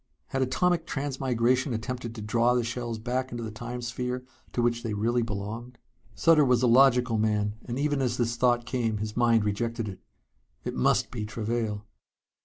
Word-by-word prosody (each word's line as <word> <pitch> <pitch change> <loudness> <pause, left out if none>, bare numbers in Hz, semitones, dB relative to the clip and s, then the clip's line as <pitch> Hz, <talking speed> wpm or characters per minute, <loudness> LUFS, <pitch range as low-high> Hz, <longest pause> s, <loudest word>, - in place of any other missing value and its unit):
Had 135 - -1
atomic 170 +6 +1
transmigration 130 -2 0
attempted 120 0 -4
to 110 - -6
draw 115 +3 +2
the 120 - +2
shells 120 0 -3
back 125 +3 -2
into 120 -1 -4
the 110 - -5
Time 120 +3 -6
sphere 125 +1 -3 0.3
to - - -3
which 120 0 +1
they 110 -3 -3
really 120 +4 +1
belonged? 115 +3 -5 0.4
Sutter 165 -2 +5
was 125 -2 +3
a - - +5
logical 125 -2 +5
man, 105 -1 +1
and 120 0 -4
even 145 0 +1
as 125 -3 0
this 120 -1 0
thought 120 -1 +2
came 115 -4 -1
his 105 +1 -4
mind 115 -3 +3
rejected 115 +2 -1
it. 95 -2 -7 0.6
It - - -3
must 65 - +2
be 115 -4 -4
Travail. 105 -1 -2
120 Hz, 180 wpm, -28 LUFS, 110-125 Hz, 0.6 s, Sutter